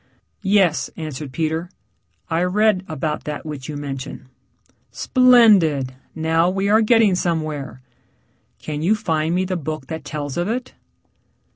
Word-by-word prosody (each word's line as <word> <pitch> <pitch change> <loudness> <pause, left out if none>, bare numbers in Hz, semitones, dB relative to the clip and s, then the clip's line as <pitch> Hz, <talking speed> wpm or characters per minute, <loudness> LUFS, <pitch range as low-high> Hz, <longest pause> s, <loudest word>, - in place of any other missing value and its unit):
"Yes," 195 -5 +2
answered 150 -4 -6
Peter. 160 +4 -2 0.6
"I 165 0 0
read 190 +1 +2
about 155 0 -3
that 150 0 -5
which 145 -3 -7
you 150 - -4
mention." 135 -2 -7 0.6
"Splendid, 210 - +4 0.2
now 165 +2 +2
we 195 +2 -1
are 220 +2 +5
getting 225 -3 +4
somewhere. 155 -7 -3 0.7
Can 150 -1 -5
you 190 +7 +3
find 165 -5 -1
me 185 +1 +1
the 185 -1 -2
book 155 -3 -5
that 160 -2 -5
tells 145 -1 -5
of 175 +1 0
it?" 245 +3 -3
160 Hz, 135 wpm, -21 LUFS, 150-195 Hz, 0.7 s, are